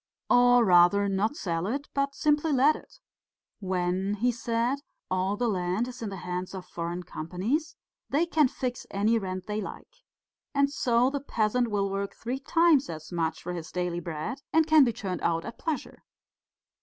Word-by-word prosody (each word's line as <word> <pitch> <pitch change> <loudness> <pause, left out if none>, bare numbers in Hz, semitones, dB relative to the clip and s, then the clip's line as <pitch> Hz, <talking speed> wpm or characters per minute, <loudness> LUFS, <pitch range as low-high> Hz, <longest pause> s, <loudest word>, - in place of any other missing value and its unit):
Or 245 -1 +6
rather, 185 +2 +5
not 200 +6 0
sell 170 - -2
it, 275 +6 -3
but 280 0 0
simply 300 +1 +2
let 285 +3 +5
it. - - -13 0.6
When,' 185 +1 -1
he 240 +4 +1
said, 235 +3 -1 0.3
'all 185 +2 0
the 245 - 0
land 185 +2 0
is 255 0 -9
in 220 - -3
the 195 - -6
hands 180 +1 -4
of 185 - -7
foreign 175 +1 -4
companies 205 - -3 0.3
they 305 +5 +2
can 315 -4 +3
fix 250 -1 -4
any 215 +4 +2
rent 185 -2 -5
they 210 0 -2
like. - - -9 0.6
And 280 0 +3
so 245 -1 +2
the 285 - -2
peasant 240 -2 +1
will 200 -2 0
work 200 0 -3
three 250 +3 -4
times 310 - +3
as 155 0 -7
much 165 -2 -2
for 180 - -4
his 170 -2 -6
daily 180 -1 -2
bread 165 - -5
and 320 0 +4
he - - -16
can 310 -2 +8
be 240 - +2
turned 190 -5 -4
out 165 -1 0
at 230 +1 -8
pleasure. 320 -3 -4
215 Hz, 180 wpm, -28 LUFS, 180-265 Hz, 0.6 s, can